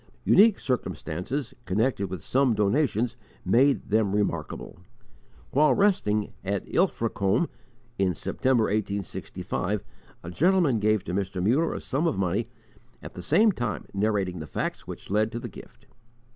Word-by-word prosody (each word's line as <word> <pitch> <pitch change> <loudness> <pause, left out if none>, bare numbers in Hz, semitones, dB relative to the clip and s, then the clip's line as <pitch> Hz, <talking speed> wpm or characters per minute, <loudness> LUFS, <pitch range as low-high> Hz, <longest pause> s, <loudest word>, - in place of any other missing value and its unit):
Unique 205 +1 +6
circumstances 125 - -3
connected 105 +1 0
with 90 -4 -6
some 130 -3 +2
donations 120 +2 +1 0.3
made 135 +3 +3
them 105 -2 +2
remarkable. 85 -5 -3 0.7
While 150 +3 +4
resting 110 - +1
at 100 0 -2
Ilfracombe, 115 - +1 0.5
in 95 -3 +2
September, 130 - +1
1865, 100 -1 -2 0.4
a 85 - -6
gentleman 165 - +3
gave 110 0 +2
to 85 - -5
Mr. 95 -1 -2
Muller 125 - +2
a - - -3
sum 145 +5 -1
of 160 - 0
money, 95 +4 0 0.5
at - - -8
the 90 - -7
same 215 - +4
time 120 - -3
narrating 100 -3 0
the 80 - -7
facts 65 - -4
which - - -8
led 110 +2 +2
to 115 - -3
the - - -6
gift. - - -14
110 Hz, 140 wpm, -26 LUFS, 95-135 Hz, 0.7 s, Unique